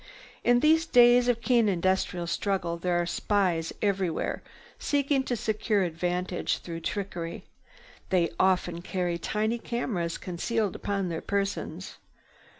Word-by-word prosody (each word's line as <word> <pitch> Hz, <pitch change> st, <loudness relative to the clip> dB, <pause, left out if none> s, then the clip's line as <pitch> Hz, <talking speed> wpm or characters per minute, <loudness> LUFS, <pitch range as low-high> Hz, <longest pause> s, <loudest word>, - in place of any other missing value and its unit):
In 245 Hz, 0 st, +4 dB
these 320 Hz, +2 st, +4 dB
days 245 Hz, -1 st, +6 dB
of 235 Hz, -2 st, +1 dB
keen 235 Hz, -2 st, +3 dB
industrial 185 Hz, -1 st, 0 dB
struggle 175 Hz, -1 st, -1 dB
there 175 Hz, +1 st, 0 dB
are 175 Hz, -, 0 dB
spies 175 Hz, -3 st, 0 dB
everywhere 195 Hz, -5 st, 0 dB, 0.4 s
seeking 280 Hz, -1 st, +1 dB
to 245 Hz, -, -1 dB
secure 215 Hz, -2 st, 0 dB
advantages 180 Hz, +1 st, -1 dB
through 165 Hz, -1 st, -7 dB
trickery. 175 Hz, -2 st, -4 dB, 0.7 s
They 175 Hz, -3 st, +2 dB
often 180 Hz, -2 st, +2 dB
carry 175 Hz, -2 st, -2 dB
tiny 220 Hz, +5 st, -1 dB
cameras 200 Hz, -9 st, -2 dB
concealed 205 Hz, +4 st, -2 dB
upon 195 Hz, -2 st, -2 dB
their 165 Hz, -1 st, -3 dB
persons. 200 Hz, 0 st, -3 dB
195 Hz, 125 wpm, -28 LUFS, 175-230 Hz, 0.7 s, days